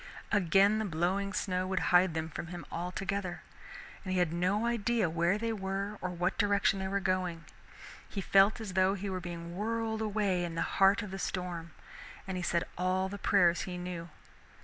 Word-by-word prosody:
Again 200 Hz, +2 st, +4 dB
the 220 Hz, -, -1 dB
blowing 190 Hz, +3 st, 0 dB
snow 185 Hz, -3 st, -1 dB
would 190 Hz, 0 st, 0 dB
hide 180 Hz, -2 st, +5 dB
them 160 Hz, 0 st, -1 dB
from 165 Hz, +1 st, -6 dB
him 175 Hz, 0 st, -7 dB
altogether. 180 Hz, +1 st, -3 dB, 0.6 s
He 185 Hz, -2 st, -1 dB
had 175 Hz, -3 st, +2 dB
no 185 Hz, +6 st, +1 dB
idea 235 Hz, -5 st, +1 dB
where 170 Hz, +4 st, +2 dB
they 225 Hz, +1 st, -1 dB
were 195 Hz, 0 st, -3 dB
or 180 Hz, -, -2 dB
what 175 Hz, 0 st, -1 dB
direction 200 Hz, -2 st, +3 dB
they 190 Hz, -, -2 dB
were 200 Hz, +1 st, 0 dB
going. 185 Hz, -3 st, -1 dB, 0.6 s
He 200 Hz, -, -4 dB
felt 195 Hz, +3 st, +4 dB
as 215 Hz, -4 st, -6 dB
though 190 Hz, +1 st, +3 dB
he 200 Hz, 0 st, -4 dB
were 185 Hz, -1 st, -3 dB
being 170 Hz, -1 st, -6 dB
whirled 220 Hz, +2 st, -1 dB
away 205 Hz, -4 st, 0 dB
in 170 Hz, -1 st, -4 dB
the 165 Hz, -, 0 dB
heart 195 Hz, +1 st, +3 dB
of 205 Hz, -, -7 dB
the 195 Hz, -, -5 dB
storm, 175 Hz, -4 st, -4 dB, 0.5 s
and 190 Hz, -, -3 dB
he 180 Hz, -, -2 dB
said 170 Hz, -1 st, +1 dB, 0.2 s
all 185 Hz, +1 st, +1 dB
the 200 Hz, +1 st, -6 dB
prayers 180 Hz, -4 st, +4 dB
he 180 Hz, -1 st, -5 dB
knew. 175 Hz, -1 st, -5 dB
185 Hz, 190 wpm, -31 LUFS, 175-200 Hz, 0.6 s, hide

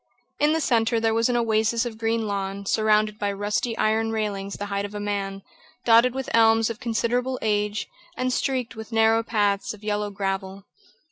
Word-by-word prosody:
In 295 Hz, +1 st, +3 dB
the 320 Hz, -, +1 dB
centre 230 Hz, -4 st, +2 dB
there 225 Hz, 0 st, +1 dB
was 230 Hz, +2 st, +2 dB
an 245 Hz, -, +1 dB
oasis 230 Hz, +1 st, +1 dB
of 225 Hz, -2 st, -6 dB
green 225 Hz, 0 st, 0 dB
lawn, 200 Hz, -1 st, -3 dB
surrounded 215 Hz, 0 st, +2 dB
by 205 Hz, -1 st, 0 dB
rusty 205 Hz, +3 st, -2 dB
iron 220 Hz, +1 st, +1 dB
railings 200 Hz, -3 st, -3 dB
the 205 Hz, -, -5 dB
height 200 Hz, 0 st, -2 dB
of 205 Hz, +1 st, -6 dB
a -, -, -3 dB
man, 200 Hz, -1 st, -3 dB, 0.4 s
dotted 235 Hz, +2 st, +5 dB
with 265 Hz, -1 st, -3 dB
elms 225 Hz, 0 st, +4 dB
of 230 Hz, -, -8 dB
considerable 245 Hz, +2 st, -1 dB
age, 210 Hz, -1 st, 0 dB, 0.3 s
and 255 Hz, 0 st, 0 dB
streaked 255 Hz, -4 st, -1 dB
with 220 Hz, +1 st, -9 dB
narrow 225 Hz, 0 st, +4 dB
paths 205 Hz, -3 st, 0 dB
of 210 Hz, -, -19 dB
yellow 210 Hz, 0 st, -1 dB
gravel. 195 Hz, -1 st, -4 dB
220 Hz, 185 wpm, -24 LUFS, 205-230 Hz, 0.4 s, dotted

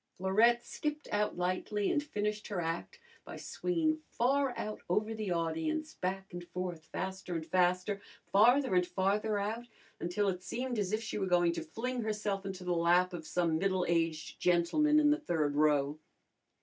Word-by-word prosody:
Florette 225 Hz, +6 st, +3 dB
skipped 300 Hz, 0 st, -4 dB
out 210 Hz, -2 st, 0 dB
lightly 185 Hz, +3 st, 0 dB
and 290 Hz, -, +2 dB
finished 210 Hz, -6 st, -3 dB
her 200 Hz, -3 st, -3 dB
act 170 Hz, -, -3 dB, 0.2 s
by -, -, -8 dB
swinging 320 Hz, -3 st, -1 dB
far 270 Hz, +2 st, +2 dB
out 215 Hz, 0 st, -4 dB
over 215 Hz, +5 st, +1 dB
the 215 Hz, -3 st, -3 dB
audience, 175 Hz, -, -1 dB
back 190 Hz, +1 st, -4 dB
and 175 Hz, 0 st, -5 dB
forth, 175 Hz, -2 st, -5 dB
faster 190 Hz, 0 st, -4 dB
and 160 Hz, -1 st, -3 dB
faster, 180 Hz, +3 st, +1 dB, 0.3 s
farther 245 Hz, +3 st, +5 dB
and 180 Hz, -1 st, +3 dB
farther 200 Hz, +4 st, +1 dB
out, 220 Hz, +4 st, -3 dB, 0.3 s
until 200 Hz, +4 st, 0 dB
it 180 Hz, -2 st, -1 dB
seemed 245 Hz, +3 st, -3 dB
as 200 Hz, -2 st, -1 dB
if 215 Hz, +1 st, 0 dB
she 215 Hz, -, -3 dB
were 190 Hz, -, 0 dB
going 175 Hz, -1 st, +4 dB
to 170 Hz, -1 st, -3 dB
fling 240 Hz, +10 st, -3 dB
herself 210 Hz, -3 st, -2 dB
into 190 Hz, -1 st, -6 dB
the 180 Hz, 0 st, 0 dB
lap 175 Hz, +2 st, +3 dB
of 160 Hz, -3 st, -6 dB
some 165 Hz, -3 st, +1 dB
middle 190 Hz, -1 st, +1 dB
aged 165 Hz, -2 st, -1 dB
gentleman 180 Hz, -, +3 dB
in 295 Hz, -1 st, +5 dB
the 300 Hz, -, +2 dB
third 155 Hz, -, 0 dB
row. 150 Hz, 0 st, +2 dB
190 Hz, 175 wpm, -32 LUFS, 175-225 Hz, 0.3 s, farther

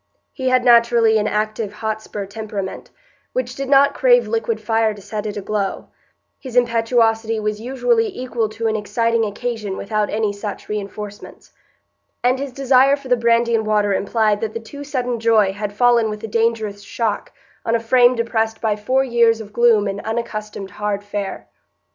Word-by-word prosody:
He 260 Hz, -2 st, -1 dB
had 255 Hz, -1 st, +2 dB
naturally 235 Hz, -2 st, +5 dB
an 210 Hz, -, 0 dB
active 215 Hz, 0 st, -2 dB
Hotspur 215 Hz, -1 st, -4 dB
temperament, 200 Hz, -1 st, -6 dB, 0.4 s
which 255 Hz, 0 st, -2 dB
did 275 Hz, 0 st, -5 dB
not 280 Hz, 0 st, +5 dB
crave -, -, +4 dB
liquid 460 Hz, 0 st, -1 dB
fire 225 Hz, -1 st, +1 dB
to -, -, -12 dB
set 210 Hz, +2 st, -5 dB
it 210 Hz, -, -5 dB
aglow; 200 Hz, 0 st, -3 dB, 0.5 s
his 255 Hz, -3 st, -9 dB
impetuosity 225 Hz, -2 st, +2 dB
was 210 Hz, 0 st, -3 dB
usually 450 Hz, -, +1 dB
equal 245 Hz, -, -3 dB
to 220 Hz, +1 st, -5 dB
an 220 Hz, -1 st, +1 dB
exciting 230 Hz, +2 st, 0 dB
occasion 215 Hz, -1 st, -3 dB
without 210 Hz, 0 st, -1 dB
any 215 Hz, -1 st, 0 dB
such 205 Hz, 0 st, -6 dB
reinforcements; 210 Hz, 0 st, -7 dB, 0.7 s
and 250 Hz, +1 st, +2 dB
his 275 Hz, -1 st, -4 dB
desire 270 Hz, +1 st, +4 dB
for 280 Hz, -2 st, -12 dB
the 250 Hz, -, +5 dB
brandy 235 Hz, 0 st, +2 dB
and 220 Hz, -1 st, +1 dB
water 210 Hz, -1 st, +2 dB
implied 210 Hz, +1 st, +1 dB
that 220 Hz, -1 st, -3 dB
the -, -, -2 dB
too 285 Hz, +6 st, -10 dB
sudden 250 Hz, -4 st, -2 dB
joy 220 Hz, -4 st, +3 dB
had 205 Hz, 0 st, -4 dB
fallen 235 Hz, +1 st, +3 dB
with 210 Hz, 0 st, -6 dB
a -, -, -3 dB
dangerous 220 Hz, -2 st, -1 dB
shock 210 Hz, +1 st, -3 dB, 0.3 s
on 230 Hz, -, +1 dB
a -, -, +2 dB
frame 245 Hz, +2 st, +4 dB
depressed 225 Hz, -1 st, -1 dB
by 220 Hz, -2 st, 0 dB
four 255 Hz, +6 st, +1 dB
years 235 Hz, -3 st, +3 dB
of 210 Hz, -1 st, -10 dB
gloom 230 Hz, -3 st, +4 dB
and 200 Hz, +1 st, -3 dB
unaccustomed 215 Hz, -3 st, -5 dB
hard 205 Hz, 0 st, -3 dB
fare. 205 Hz, -1 st, -5 dB
225 Hz, 170 wpm, -20 LUFS, 210-245 Hz, 0.7 s, naturally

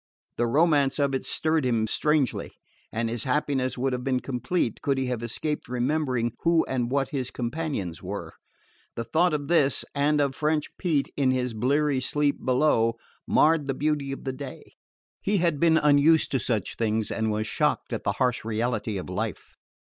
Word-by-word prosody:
The 120 Hz, -, +1 dB
romance 145 Hz, 0 st, +3 dB
of 140 Hz, -2 st, +1 dB
it 135 Hz, -, -1 dB
stirred 155 Hz, -1 st, 0 dB
him 115 Hz, -3 st, +1 dB
strangely, 150 Hz, +3 st, 0 dB, 0.4 s
and 115 Hz, +1 st, -1 dB
his 115 Hz, 0 st, -3 dB
happiness 135 Hz, -2 st, 0 dB
would 130 Hz, +1 st, 0 dB
have 125 Hz, 0 st, -3 dB
been 130 Hz, -1 st, +1 dB
complete 130 Hz, +2 st, -2 dB
could 140 Hz, -1 st, 0 dB
he 135 Hz, -, 0 dB
have 125 Hz, -2 st, -2 dB
escaped 145 Hz, +6 st, -3 dB
remembering 125 Hz, -1 st, 0 dB
who 165 Hz, -1 st, +3 dB
and 125 Hz, -2 st, -1 dB
what 135 Hz, 0 st, 0 dB
his 130 Hz, -3 st, -3 dB
companions 120 Hz, -, -3 dB
were. -, -, -6 dB, 0.6 s
The 115 Hz, -, -3 dB
thought 160 Hz, +10 st, +2 dB
of 145 Hz, -2 st, -2 dB
this, 150 Hz, -5 st, +2 dB
and 145 Hz, +1 st, +2 dB
of 140 Hz, -2 st, +1 dB
French 150 Hz, +1 st, -1 dB
Pete 155 Hz, -7 st, 0 dB
in 135 Hz, -2 st, +2 dB
his 125 Hz, -2 st, 0 dB
bleary 140 Hz, +5 st, +1 dB
sleep 145 Hz, +3 st, 0 dB
below, 125 Hz, -4 st, +2 dB, 0.3 s
marred 155 Hz, -2 st, +3 dB
the 135 Hz, -, -1 dB
beauty 145 Hz, -1 st, -1 dB
of 135 Hz, -, -6 dB
the 130 Hz, -, -3 dB
day. 135 Hz, 0 st, -9 dB, 0.5 s
He 205 Hz, +1 st, +1 dB
had 170 Hz, -5 st, +1 dB
been 165 Hz, 0 st, +4 dB
unused 150 Hz, +2 st, +4 dB
to 135 Hz, -, +1 dB
such 110 Hz, -4 st, -1 dB
things 110 Hz, -1 st, 0 dB
and 110 Hz, -1 st, -1 dB
was 110 Hz, 0 st, -1 dB
shocked -, -, 0 dB
at -, -, -3 dB
the -, -, 0 dB
harsh 125 Hz, -1 st, 0 dB
reality 115 Hz, -1 st, -1 dB
of 90 Hz, -, -5 dB
life. -, -, -4 dB
135 Hz, 180 wpm, -26 LUFS, 120-150 Hz, 0.6 s, been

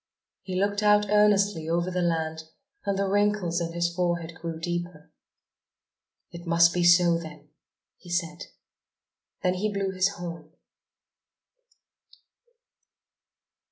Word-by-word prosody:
He 185 Hz, -1 st, -4 dB
looked 200 Hz, +1 st, 0 dB
out 210 Hz, -1 st, +3 dB
earnestly 205 Hz, -5 st, +3 dB
over 170 Hz, +2 st, 0 dB
the 180 Hz, 0 st, -1 dB
land 160 Hz, -2 st, -1 dB, 0.4 s
and 200 Hz, -1 st, 0 dB
the 200 Hz, -, 0 dB
wrinkles 200 Hz, -4 st, +1 dB
in 165 Hz, 0 st, -3 dB
his 170 Hz, 0 st, -1 dB
forehead 170 Hz, -2 st, -2 dB
grew 165 Hz, 0 st, -6 dB
deeper. 175 Hz, -2 st, -5 dB, 1.2 s
"It 170 Hz, 0 st, -10 dB
must 170 Hz, 0 st, +5 dB
be 175 Hz, -, 0 dB
so 175 Hz, -1 st, +5 dB
then!" 150 Hz, -2 st, -11 dB, 0.5 s
he 180 Hz, -, -15 dB
said. 175 Hz, 0 st, -3 dB, 1.0 s
Then 180 Hz, -1 st, +2 dB
he 205 Hz, +3 st, -2 dB
blew 195 Hz, -1 st, -2 dB
his 185 Hz, +1 st, +1 dB
horn. 170 Hz, -5 st, -8 dB
175 Hz, 120 wpm, -26 LUFS, 170-195 Hz, 1.2 s, must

